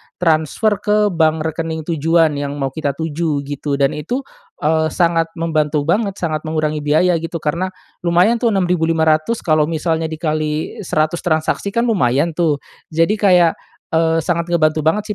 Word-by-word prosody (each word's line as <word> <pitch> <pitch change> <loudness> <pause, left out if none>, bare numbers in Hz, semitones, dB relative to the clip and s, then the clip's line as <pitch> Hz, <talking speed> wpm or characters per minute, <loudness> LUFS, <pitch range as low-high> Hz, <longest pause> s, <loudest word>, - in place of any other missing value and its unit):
transfer 175 +5 +1
ke 210 0 +2
bank 160 -2 +1
rekening 160 0 -3
tujuan 160 -1 +2
yang 145 0 -3
mau 135 -2 -2
kita 140 -2 -3
tuju 160 -2 -2
gitu 145 0 -3
dan 140 -1 +2
itu, 245 - -3 0.4
eee, 160 +1 +2
sangat 165 0 +1
membantu 155 -3 0
banget 200 +5 0
sangat 160 -5 -2
mengurangi 155 -1 -1
biaya 155 +4 +2
gitu, 165 +1 -6
karena 170 +5 -1 0.3
lumayan 180 +7 +2
tuh 235 - +1
Rp6.500 165 -1 +1
kalau 155 -3 +2
misalnya 160 0 -1
dikali 155 -1 -3
100 155 +2 0
transaksi 160 +3 -1
kan 235 - +2
lumayan 165 - +1
tuh 155 -5 +1 0.3
jadi 165 +6 +2
kayak, 180 -5 +4 0.4
eee, 165 0 +2
sangat 170 +1 -2
ngebantu 155 -2 +2
banget 200 +7 +1
160 Hz, 150 wpm, -18 LUFS, 155-175 Hz, 0.4 s, kayak